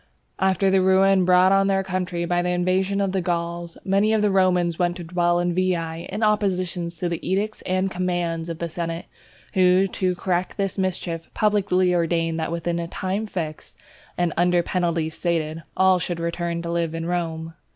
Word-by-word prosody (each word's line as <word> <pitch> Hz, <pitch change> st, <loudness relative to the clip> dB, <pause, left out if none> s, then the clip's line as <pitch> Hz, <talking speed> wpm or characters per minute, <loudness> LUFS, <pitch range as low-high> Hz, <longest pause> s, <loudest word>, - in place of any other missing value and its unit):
After 190 Hz, 0 st, +2 dB
the 190 Hz, 0 st, +4 dB
ruin 190 Hz, 0 st, +4 dB
brought 180 Hz, +1 st, +5 dB
on 195 Hz, 0 st, +4 dB
their 195 Hz, -1 st, +1 dB
country 180 Hz, -2 st, -2 dB
by 175 Hz, +1 st, +1 dB
the 180 Hz, -, -1 dB
invasion 185 Hz, +2 st, +1 dB
of 195 Hz, -1 st, 0 dB
the 190 Hz, 0 st, 0 dB
Gauls, 170 Hz, -1 st, -3 dB
many 200 Hz, +3 st, +2 dB
of 215 Hz, -1 st, +2 dB
the 205 Hz, -, +3 dB
Romans 180 Hz, -3 st, +2 dB
went 175 Hz, -1 st, +1 dB
to 175 Hz, -, -7 dB
dwell 175 Hz, 0 st, +1 dB
in 175 Hz, 0 st, 0 dB
Veii, 170 Hz, -2 st, -1 dB
in 210 Hz, +3 st, -2 dB
opposition 185 Hz, -5 st, 0 dB
to 170 Hz, +1 st, -4 dB
the 170 Hz, -1 st, -2 dB
edicts 205 Hz, +4 st, -2 dB
and 185 Hz, +1 st, 0 dB
commands 175 Hz, -2 st, -2 dB
of 165 Hz, -, -4 dB
the 170 Hz, -, -3 dB
senate, 165 Hz, +1 st, -4 dB, 0.5 s
who, 185 Hz, 0 st, +4 dB
to 185 Hz, -1 st, -1 dB
correct 180 Hz, 0 st, -2 dB
this 195 Hz, -2 st, -1 dB
mischief, 175 Hz, -3 st, -2 dB
publicly 195 Hz, -4 st, +2 dB
ordained 165 Hz, -1 st, 0 dB
that 160 Hz, +1 st, -2 dB
within 170 Hz, 0 st, -2 dB
a 170 Hz, -, -3 dB
time 190 Hz, +5 st, -3 dB
fixed, 160 Hz, -6 st, -6 dB, 0.4 s
and 175 Hz, -3 st, 0 dB
under 175 Hz, 0 st, +3 dB
penalties 170 Hz, -3 st, -1 dB
stated, 165 Hz, -2 st, -1 dB, 0.2 s
all 190 Hz, -1 st, +4 dB
should 175 Hz, 0 st, -3 dB
return 170 Hz, 0 st, -2 dB
to 170 Hz, -, -3 dB
live 170 Hz, -1 st, -1 dB
in 165 Hz, 0 st, -3 dB
Rome. 165 Hz, -2 st, -3 dB
180 Hz, 185 wpm, -23 LUFS, 170-190 Hz, 0.5 s, brought